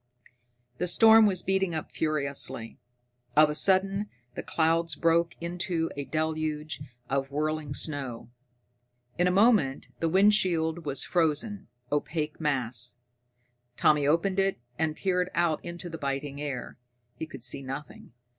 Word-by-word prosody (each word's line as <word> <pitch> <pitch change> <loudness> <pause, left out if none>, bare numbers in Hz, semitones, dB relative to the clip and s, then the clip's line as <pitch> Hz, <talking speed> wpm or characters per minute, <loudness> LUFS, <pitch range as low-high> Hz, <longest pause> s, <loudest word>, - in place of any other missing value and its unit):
The 180 - 0
storm 220 +4 +7
was 185 -3 0
beating 190 -3 +1
up 155 - -5
furiously. 140 -7 -2 0.6
Of 150 0 +6
a - - -2
sudden 195 +4 +3 0.2
the - - -5
clouds 165 0 +1
broke 170 +2 +2
into 170 -1 -2
a 140 -1 -4
deluge 155 -1 -2 0.3
of 135 0 -1
whirling 150 0 -2
snow. 135 -7 -3 0.9
In 175 - +4
a - - +4
moment 195 - +3
the 165 - 0
windshield 175 -4 +2
was 140 -1 0
a - - -11
frozen, 175 +5 0 0.2
opaque 150 +1 -2
mass. 125 -5 -1 0.8
Tommy 150 -2 +3
opened 185 +5 +2
it, 195 -6 +1 0.2
and 160 -1 0
peered 180 -1 0
out 170 -2 +1
into 175 0 -6
the 165 -1 -7
biting 140 +1 -3
air. 135 -4 -5 0.4
He 160 - -6
could 135 -6 -10
see 135 - 0
nothing.... 135 +2 -8
160 Hz, 135 wpm, -28 LUFS, 145-180 Hz, 0.9 s, storm